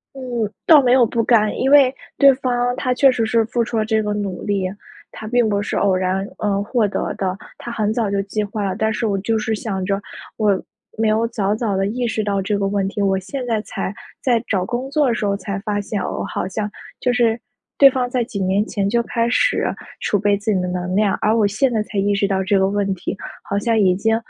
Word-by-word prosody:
嗯， 270 - -8 0.4
倒 310 -3 +8
没 250 -2 +2
有 255 -2 +6
不 230 +1 -1
甘。 215 -3 +3
因 265 - +1
为 275 -2 +6 0.2
对 275 -1 +7
方 245 -1 0
他 255 0 0
确 270 +1 +5
实 235 -3 0
是 225 0 +2
付 235 +1 0
出 230 0 -3
了 215 - +1
这 220 0 +1
个 210 -1 -2
努 200 -3 -4
力， 200 -3 -1 0.5
他 215 - -8
并 240 0 +2
不 205 -1 0
是 205 - -3
偶 195 -2 +2
然， 185 +1 -1
呃， 200 -1 0
获 220 0 +1
得 200 - -2
的， 185 -1 -2 0.2
他 240 - -7
很 215 -2 0
早 225 -3 0
就 200 0 0
计 210 +2 -2
划 205 +1 -4
了。 190 -2 -1
但 220 0 +1
是 225 +2 -2
我 200 -2 0
就 225 +3 0
是 220 +1 -1
想 205 -3 -3
着 195 +1 -1 0.4
我 205 -3 +2 0.4
没 225 0 +1
有 220 +2 +2
早 210 -3 -1
早 215 -4 -1
地 195 - +1
意 240 +4 -1
识 220 -1 -1
到 200 -1 0
这 205 +2 -1
个 200 -1 0
问 195 -1 0
题， 205 +1 -3
我 195 -1 +2
现 255 +7 -5
在 225 -3 0
才 200 - -5 0.3
在 240 -4 +1
找 185 -3 0
工 250 +5 -3
作 295 0 +2
的 240 - +2
时 215 - -2
候 200 0 0
才 200 0 -4
发 205 0 -2
现， 205 0 -3
哦， - - -3
好 - - -3
像， 210 +2 -3 0.3
就 250 - +1
是 235 -1 +2 0.4
对 280 - +9
方 255 -2 -1
在 250 -1 0
几 225 -3 -6
年 190 +2 +1
前 200 -2 -1
就 235 +2 +1
开 235 0 -1
始 - - +2 0.4
储 205 - +1
备 205 +1 +2
自 205 +2 -1
己 190 - +1
的 180 - -2
能 180 0 -3
量， 205 -1 +2
而 215 +2 +2
我 215 - +3
现 215 +6 +1
在 220 -2 0
才 210 -1 -4
意 200 +1 +1
识 200 0 +1
到 190 -1 0
这 200 +1 +2
个 190 0 +3
问 200 0 0
题， 175 - -4 0.3
好 200 - -2
像 225 +1 +1
已 185 -3 +4
经， 225 +4 +1
215 Hz, 270 characters per minute, -20 LUFS, 200-235 Hz, 0.5 s, 对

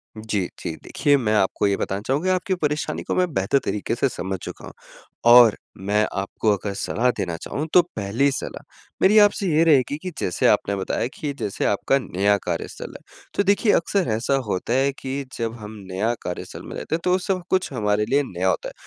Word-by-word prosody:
जी, 110 -4 -2
जी। 80 - -4
देखिए 145 -2 +2
मैं 110 -5 0
आपको 100 0 +2
ये 100 - +2
बताना 95 +1 -2
चाहूँगा 170 +8 +1
आपकी 185 +1 -1
परेशानी 150 -3 -2
को - - -2
मैं 180 0 +2
बेहतर 95 +7 +2
तरीके 105 +2 -2
से 135 - +1
समझ 95 -5 -4
चूका - - -8
हूँ - - -10 0.6
और 120 -3 +8 0.3
मैं 105 +1 +3
आपको 100 +2 0
अगर 100 +1 -5
सलाह 120 +5 0
देना 85 -3 -2
चाहूँ 150 +3 -4
तो 180 - +8
पहली 110 +7 +1
सलाह - - -5 0.4
मेरी 205 +3 +5
आपसे 205 -1 +4
ये 160 -1 +3
रहेगी 145 -3 +3
कि, 180 +3 -6
जैसे 90 - +1
आपने 100 - +2
बताया 95 +4 -2
कि 145 -2 -4
जैसे 100 - -2
आपका 105 +6 +2
नया 100 -1 +1
कार्यस्थल 85 -2 -4
है। - - -26 0.3
तो 200 - +1
देखिए 205 +2 +3
अक्सर 185 +2 +1
ऐसा 115 +5 +1
होता 100 +4 -1
है 135 +2 +2
कि 135 +1 -4
जब 115 -1 -2
हम 105 0 -8 0.2
नया 105 +6 0
कार्यस्थल 90 - -6
में - - -7
रहते - - -3
हैं 165 - -2
तो 180 0 +3
सब 185 -1 -2
कुछ 185 -4 +1
हमारे 105 -2 +1
लिए 140 +1 +3
नया 90 -4 -2
होता - - -1
है। - - -15
120 Hz, 205 wpm, -23 LUFS, 100-155 Hz, 0.6 s, और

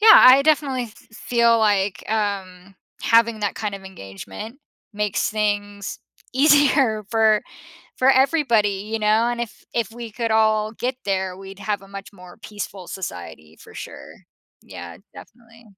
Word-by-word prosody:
yeah, 435 +1 +9
I 260 +2 +8
definitely 280 -5 +1 0.3
feel, 235 0 +2
like, 200 -5 +1
um, 195 -3 -3 0.3
having 230 -1 +3
that 205 - -1
kind 210 -2 -4
of 195 - -9
engagement 100 - -9 0.3
makes 210 -1 -1
things 205 -2 -2 0.4
easier 275 -6 +4
for 220 -2 +3 0.6
for 260 +1 +5
everybody, 235 -8 +2
you 225 - 0
know, 215 +2 +2
and 240 - -3
if 235 - -7
if 230 -2 -1
we 235 -1 -8
could 230 0 -3
all 215 -1 +2
get 250 +3 -3
there, 190 -2 -1
we'd 195 0 -11
have 205 -1 -3
a 195 - -15
much 195 0 -9
more 180 -1 -14
peaceful 200 -3 -7
society 80 - -8
for - - -15
sure. - - -9 0.5
Yeah, 85 0 -10 0.2
definitely. 230 0 -16
215 Hz, 145 wpm, -22 LUFS, 195-235 Hz, 0.6 s, yeah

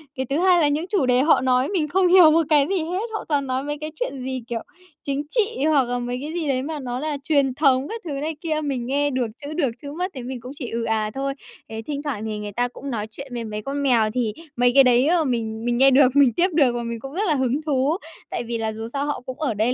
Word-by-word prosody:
cái 260 - -2
thứ 280 - 0
hai 360 -1 +4
là 300 - +4
những 295 +3 0
chủ 375 -10 +1
đề 250 0 +3
họ 305 -2 +4
nói 255 +1 +2
mình 335 -7 0
không 370 +4 +2
hiểu 350 -3 +8
một 330 +1 +4
cái 290 -2 +4
gì 380 -4 0
hết. 360 +4 -2
Họ 430 - -3
toàn 285 -3 +1
nói 260 +1 -1
mấy 295 +1 -3
cái 310 - -4
chuyện 280 - -3
gì, 260 -1 -3
kiểu, 235 -2 -2 0.5
chính 280 0 -1
trị 450 - 0
hoặc 295 -4 +4
là 245 0 -2
mấy 245 0 -3
cái 305 +3 -5
gì 335 -3 -2
đấy 260 -2 +1
mà 310 0 -4
nó 250 -2 -4
là 300 0 -2
truyền 280 -4 +2
thống 275 -2 +3
các 455 0 -5
thứ 320 - -4
này 305 +3 -3
kia. 310 -2 -1
Mình 265 -4 -2
nghe 285 +3 +1
được 255 -3 -1
chữ 290 +1 -6
được, 300 -6 +1
chữ 285 - -7
mất 365 +2 -2
thì 255 - -6
mình 250 0 -6
cũng 250 +3 -8
chỉ 255 -5 -6
ừ 230 0 -2
à 220 -1 0
thôi. 275 0 -2 0.4
Ấy, 220 0 -5
thỉnh 285 +5 -5
thoảng 245 -8 -3
thì 215 -1 -3
người 210 0 -5
ta 245 +4 0
cũng 275 +3 -8
nói 215 -3 -3
chuyện 275 +5 -8
với 235 - -3
mấy 210 0 -5
con 280 +5 -3
mèo 230 -5 +3
thì 235 -4 -1 0.2
mấy 245 0 +4
cái 275 - +9
đấy, 250 +2 +4
ờ, 340 -1 +3
mình 230 -4 -2
mình 240 0 +1
nghe 270 +1 +6
được, 265 0 +5
mình 270 -5 +5
tiếp 350 +7 +3
được 280 -6 +4
và 240 - -2
mình 235 0 -4
cũng 270 +4 -9
rất 390 - -1
là 310 - +2
hứng 260 +2 0
thú. 285 +2 +1 0.3
Tại - - -3
vì 235 0 -3
là 220 -1 -2
dù 225 +1 -6
sao 280 0 -1
họ 290 -3 -3
cũng 260 +2 -7
ở 285 -7 0
đây 220 +4 +1
270 Hz, 290 wpm, -23 LUFS, 245-300 Hz, 0.5 s, cái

